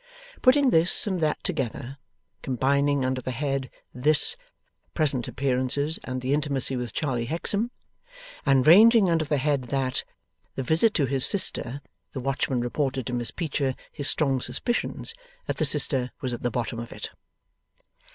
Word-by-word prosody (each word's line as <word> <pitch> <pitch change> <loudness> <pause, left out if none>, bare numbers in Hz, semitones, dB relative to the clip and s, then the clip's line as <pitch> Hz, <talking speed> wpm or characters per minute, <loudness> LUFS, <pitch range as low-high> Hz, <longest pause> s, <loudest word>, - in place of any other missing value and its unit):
Putting 265 0 +4
this 165 +7 +4
and 190 -4 -1
that 155 -2 -1
together 130 +2 -4 0.4
combining 140 +2 +1
under 130 0 -1
the 130 - -5
head 135 0 -2 0.2
'this,' 150 - +3 0.6
present 140 -7 +1
appearances 135 +3 -1
and 130 0 -4
the 130 +2 0
intimacy 140 -3 0
with 125 -2 -4
Charley 125 -5 -2
Hexam, 200 - -1 0.7
and 135 -2 +3
ranging 210 +3 +7
under 160 -1 +1
the 145 0 0
head 140 -1 0
'that' 130 +1 0 0.5
the 135 - -3
visit 165 - +4
to 145 - +2
his 135 0 +1
sister, 140 -8 0 0.3
the 135 - -4
watchman 135 -1 -1
reported 130 +1 -2
to 125 - -4
Miss 120 -1 -1
Peecher 140 -5 -2 0.2
his 145 - 0
strong 135 -4 +1
suspicions 240 - -2 0.3
that - - -3
the - - +1
sister 130 -4 0
was 130 -2 -3
at 120 - -6
the 120 - 0
bottom 120 0 -3
of 115 - -7
it. - - -7
135 Hz, 155 wpm, -25 LUFS, 130-155 Hz, 0.7 s, ranging